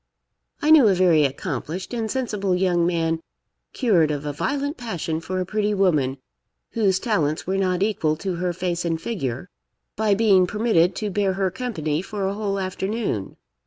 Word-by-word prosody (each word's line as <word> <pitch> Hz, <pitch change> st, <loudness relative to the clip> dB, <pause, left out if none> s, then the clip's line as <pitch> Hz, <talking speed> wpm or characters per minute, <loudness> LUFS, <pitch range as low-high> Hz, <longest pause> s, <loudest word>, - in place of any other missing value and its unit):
I 305 Hz, -, +4 dB
knew 295 Hz, -7 st, +8 dB
a 195 Hz, -, +4 dB
very 170 Hz, -5 st, +4 dB
accomplished 155 Hz, -, -4 dB
and 225 Hz, -2 st, -2 dB
sensible 210 Hz, -8 st, -1 dB
young 180 Hz, -2 st, +2 dB
man 165 Hz, -2 st, 0 dB, 0.5 s
cured 185 Hz, -, +2 dB
of 150 Hz, -1 st, -3 dB
a 145 Hz, -, -3 dB
violent 285 Hz, -, -2 dB
passion 175 Hz, -, -3 dB
for 185 Hz, +2 st, -3 dB
a 185 Hz, -, -1 dB
pretty 210 Hz, +2 st, 0 dB
woman, 150 Hz, -9 st, +2 dB, 0.5 s
whose 200 Hz, -5 st, +2 dB
talents 165 Hz, -8 st, 0 dB
were 190 Hz, +1 st, -1 dB
not 185 Hz, -1 st, +1 dB
equal 170 Hz, -7 st, +1 dB
to 180 Hz, +2 st, -4 dB
her 180 Hz, +1 st, -1 dB
face 175 Hz, 0 st, -2 dB
and 165 Hz, -2 st, -1 dB
figure, 160 Hz, -, -4 dB, 0.5 s
by 215 Hz, -2 st, +2 dB
being 195 Hz, -4 st, +4 dB
permitted 200 Hz, -4 st, +2 dB
to 210 Hz, -2 st, -3 dB
bear 195 Hz, 0 st, +1 dB
her 190 Hz, -1 st, 0 dB
company 170 Hz, -9 st, -2 dB
for 200 Hz, 0 st, -4 dB
a 195 Hz, -, -1 dB
whole 200 Hz, -1 st, -2 dB
afternoon. 190 Hz, -, -3 dB
185 Hz, 170 wpm, -23 LUFS, 165-210 Hz, 0.5 s, knew